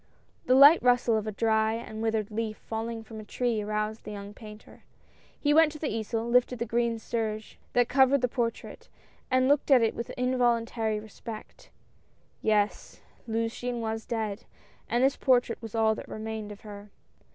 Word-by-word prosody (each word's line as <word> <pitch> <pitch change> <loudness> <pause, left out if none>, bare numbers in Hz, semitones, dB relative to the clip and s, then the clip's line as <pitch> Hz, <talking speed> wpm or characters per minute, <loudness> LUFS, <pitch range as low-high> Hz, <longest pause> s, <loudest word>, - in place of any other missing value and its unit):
The 255 - +5
light 285 +5 +8
rustle 245 -2 +3
of 220 0 -1
a - - -1
dry 220 +1 +1
and 220 -1 -7
withered 220 -1 -1
leaf 215 0 -3
falling 225 0 -5
from 220 0 -10
a - - -8
tree 230 +1 -1
aroused 215 +1 -3
the - - -8
young 205 0 -7
painter; 210 -1 -13 0.6
he 295 0 +2
went 320 0 +6
to - - -8
the 300 -6 -3
easel, 225 +1 -2
lifted 250 +1 +2
the 235 - -2
green 235 0 0
serge 220 -1 -4
that 245 -1 +3
cowered 265 +1 +4
the 250 - +2
portrait, 235 -1 -4 0.4
and 255 0 +3
looked 285 +1 +2
at 260 -4 +6
it 225 - +2
with 235 - -6
involuntary 235 -3 +1
respect. 215 +1 -10 0.7
Yes, 210 -1 0 0.3
Luciane 230 +2 -2
was 220 -1 -3
dead, 220 -3 -3 0.4
and 240 +3 +2
this 270 +1 +3
portrait 245 -3 +2
was 225 -1 -8
all 220 -1 +3
that - - -8
remained 220 -1 -5
of 205 - -11
her. 205 -1 -10
225 Hz, 175 wpm, -28 LUFS, 215-245 Hz, 0.7 s, light